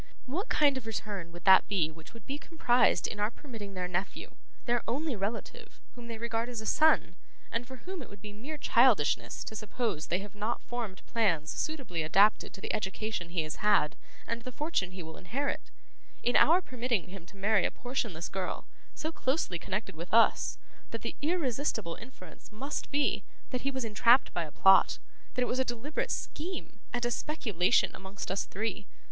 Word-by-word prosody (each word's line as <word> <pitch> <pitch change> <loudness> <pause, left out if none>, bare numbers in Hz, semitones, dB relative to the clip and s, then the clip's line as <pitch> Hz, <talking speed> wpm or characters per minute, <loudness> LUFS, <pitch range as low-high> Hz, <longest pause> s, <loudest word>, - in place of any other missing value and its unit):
What 330 +11 -3
kind 285 -3 +4
of 225 - -13
return 205 -6 -4
would 175 -1 -11
that 190 0 +8
be 175 -6 +1
which 160 0 -14
would 230 - -12
be 280 +2 -4
comprised 250 -7 +3
in 205 - -3
our 210 +1 +2
permitting 225 -7 -9
their 180 -1 -2
nephew, 180 +2 -3 0.3
their 240 -1 +2
only 275 +4 -1
relative, 205 +3 -5
whom 240 -1 -10
they 230 -1 -5
regard 230 +1 -2
as 240 -2 -4
a 220 - -6
son, 305 - +4 0.4
and 235 +1 -2
for 260 - -8
whom 370 -2 -5
it 255 - -9
would 200 - -12
be 210 +1 -8
mere 275 +9 -6
childishness 235 - +3
to 220 - -7
suppose 215 -6 -2
they 175 - +1
have 200 0 -7
not 210 +3 -2
formed 230 -6 -5
plans 170 -10 +1
suitably 270 - -2
adapted 195 +7 +4
to 195 - -10
the - - -2
education 210 -3 -2
he 170 -2 0
has 155 - -5
had, 205 -8 +3 0.3
and 230 0 -3
the 255 - -6
fortune 295 - -1
he 185 -1 -8
will 160 0 -9
inherit 265 +10 -3 0.5
in 245 - +2
our 350 +4 +6
permitting 240 - -1
him 185 -2 -10
to 195 - -15
marry 200 0 +3
a - - +3
portionless 230 -10 -3
girl: 190 -1 -3 0.3
so 315 - -3
closely 260 - 0
connected 190 0 -3
with 170 +3 -7
us, 230 +1 +4 0.3
that - - -5
the - - -3
irresistible 280 - 0
inference 200 -7 -12
must 270 +7 -4
be, 290 0 +1 0.3
that 250 -2 -1
he 275 - 0
was 265 -3 -2
entrapped 230 +4 +5
by 170 - 0
a 150 - -10
plot; 190 +4 +6 0.4
that 250 - +2
it - - 0
was 255 - 0
a - - +4
deliberate 245 +5 -3
scheme, 335 -8 -4
and 245 0 -1
a 240 - +1
speculation 215 - +2
amongst 190 0 -6
us 195 - 0
three? 210 0 -3
220 Hz, 190 wpm, -31 LUFS, 190-255 Hz, 0.5 s, that